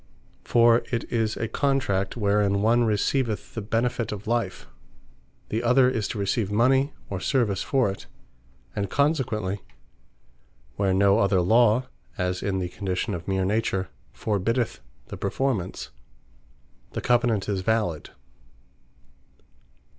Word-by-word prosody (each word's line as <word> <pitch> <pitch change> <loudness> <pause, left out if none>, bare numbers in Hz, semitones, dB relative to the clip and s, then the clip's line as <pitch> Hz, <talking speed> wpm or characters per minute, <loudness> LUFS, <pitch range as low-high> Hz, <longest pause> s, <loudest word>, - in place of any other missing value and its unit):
For 115 -1 +5
it 115 -2 -1
is 110 -2 0
a 115 - -2
Contract, 115 -6 0
wherein 100 -1 +2
one 120 +2 +4
receiveth 110 +2 0
the 110 - -4
benefit 115 +2 -1
of 105 -1 -6
life; 105 - -2 0.8
the 110 - -1
other 125 +2 +4
is 110 -5 -1
to - - -5
receive 100 +1 -1
mony, 130 +6 +3 0.2
or 95 - -2
service 105 -3 +1
for 135 -4 +1
it; 95 - -10 0.7
and 100 -2 -2
consequently, 120 - 0 1.1
where 100 -1 +1
no 100 +2 +4
other 100 -2 +3
Law 115 +6 +4 0.3
(as 90 -1 -1
in 100 -1 -1
the 90 -1 -2
condition, 95 -1 -3
of 85 -1 -6
meer 95 -1 0
Nature) 95 -2 0 0.2
forbiddeth 115 +3 -1 0.3
the - - -6
performance, 100 - -2 1.0
the - - -3
Covenant 120 -4 +2
is 100 -3 -1
valid. 100 -7 -1
105 Hz, 125 wpm, -25 LUFS, 95-120 Hz, 1.1 s, For